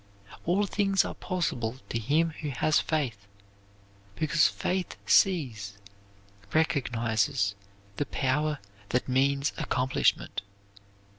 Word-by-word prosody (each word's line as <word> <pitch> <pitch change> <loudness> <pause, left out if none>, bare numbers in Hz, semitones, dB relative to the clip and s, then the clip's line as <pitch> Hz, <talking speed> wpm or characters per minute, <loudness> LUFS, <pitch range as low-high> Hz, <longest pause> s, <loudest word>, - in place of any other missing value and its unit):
All 190 +5 +2
things 195 -1 +2
are - - -4
possible 130 - -2
to 115 - -1
him 155 +8 +2
who 150 - -3
has 150 +3 +2
faith, 120 -11 -2 0.9
because 155 +3 +3
faith 185 0 -2
sees, 125 - +2 0.8
recognizes 120 -6 +1 0.4
the 145 - -1
power 145 +4 0 0.3
that 125 - 0
means 140 +2 +2
accomplishment. 130 -4 +1
140 Hz, 95 wpm, -28 LUFS, 120-160 Hz, 0.9 s, because